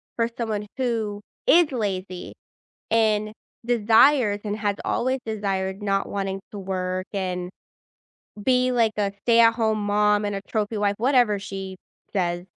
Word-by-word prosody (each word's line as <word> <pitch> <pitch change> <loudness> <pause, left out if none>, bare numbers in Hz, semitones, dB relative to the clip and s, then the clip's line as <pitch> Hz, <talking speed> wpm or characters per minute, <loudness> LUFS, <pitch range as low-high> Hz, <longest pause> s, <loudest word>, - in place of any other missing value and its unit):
for 230 0 +1
someone 215 -3 -3
who 220 -5 -2 0.2
is 335 -3 +5
lazy 190 -6 -4 0.6
and 215 -1 +2 0.3
desires, 230 -1 +4
and 210 0 -2
has 205 -2 -1
always 260 +2 0
desired, 195 -2 -2
not 195 -1 0
wanting 195 -1 -3
to 205 - -6
work 185 -1 -3
and 180 -2 -3 0.9
be 255 +1 +3
like 230 -3 +2
a 200 -1 0
stay-at-home 230 -1 +4
mom 210 0 +2
and 205 -1 -2
a 195 - -4
trophy 215 0 -2
wife, 205 -1 +1
whatever 245 -3 +3
she 195 -1 -7 0.4
says, 175 -2 -1
210 Hz, 135 wpm, -24 LUFS, 195-230 Hz, 0.9 s, is